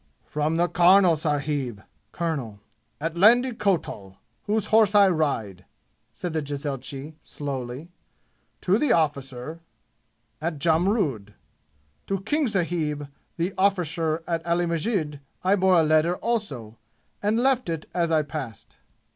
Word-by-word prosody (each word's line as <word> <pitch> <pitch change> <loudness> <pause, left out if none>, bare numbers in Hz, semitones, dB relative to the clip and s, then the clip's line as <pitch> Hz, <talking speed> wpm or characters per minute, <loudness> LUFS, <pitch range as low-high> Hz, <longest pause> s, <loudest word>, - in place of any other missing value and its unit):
"From 150 +2 -1
the 175 +1 +3
karnal 180 0 +5
sahib 145 - -2 0.3
(colonel) 140 -12 -3 0.4
at 165 +2 -3
Landi 240 +8 +5
Kotal, 165 - -2 0.3
whose 210 0 +1
horse 215 -2 +5
I 200 -1 +7
ride," 115 - -1 0.5
said 175 -3 -5
the 160 - 0
jezailchi 140 0 -5
slowly, 135 +2 -6 0.7
"to 190 +4 +2
the 300 - +1
arrficer 145 -1 -1 0.8
at 160 -1 -2
Jamrud. 160 - +1 0.7
To 195 -1 -1
King 290 +8 0
sahib, 165 -7 -1 0.3
the 175 +3 -1
arrficer 165 -4 +1
at 165 -1 -2
Ali 170 +1 +1
Masjid 165 -3 -1 0.2
I 190 +2 +4
bore 185 -2 +4
a - - +4
letter 155 +3 +3
also, 145 - -3 0.4
and 210 +2 +1
left 255 -5 +2
it 165 -2 -3
as 170 -2 +1
I 155 -1 +3
passed." 140 -7 -8
165 Hz, 125 wpm, -25 LUFS, 145-190 Hz, 0.8 s, I